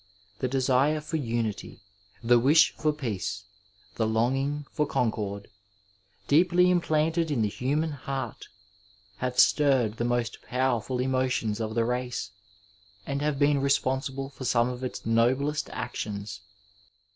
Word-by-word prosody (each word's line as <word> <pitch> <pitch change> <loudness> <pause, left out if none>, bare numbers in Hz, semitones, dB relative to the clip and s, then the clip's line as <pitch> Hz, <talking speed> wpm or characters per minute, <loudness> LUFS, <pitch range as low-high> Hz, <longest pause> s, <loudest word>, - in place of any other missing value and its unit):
The 130 - 0
desire 135 +3 +2
for 155 +2 -3
unity, 115 -6 -3 0.4
the 120 +1 +5
wish 150 +6 +5
for 155 - +1
peace, 110 -8 -4 0.5
the 110 - +1
longing 135 +6 0
for 150 - 0
concord, 100 -4 -2 0.8
deeply 180 +4 +4
implanted 165 -1 +1
in 130 -7 +1
the - - +2
human 145 +8 -1
heart, 135 -2 -5 0.7
have 125 +2 -3
stirred 130 -8 +4
the - - -1
most 120 -2 -1
powerful 125 -1 -1
emotions 130 -4 0
of 110 0 -3
the 115 -1 +2
race, 125 -4 -3 0.7
and 140 0 -3
have 150 -1 0
been 145 0 +3
responsible 135 0 0
for 135 - -9
some 120 -1 +2
of 125 +1 -6
its 130 - -5
noblest 130 +7 +1
actions. 100 -1 -5
130 Hz, 130 wpm, -27 LUFS, 115-145 Hz, 0.8 s, the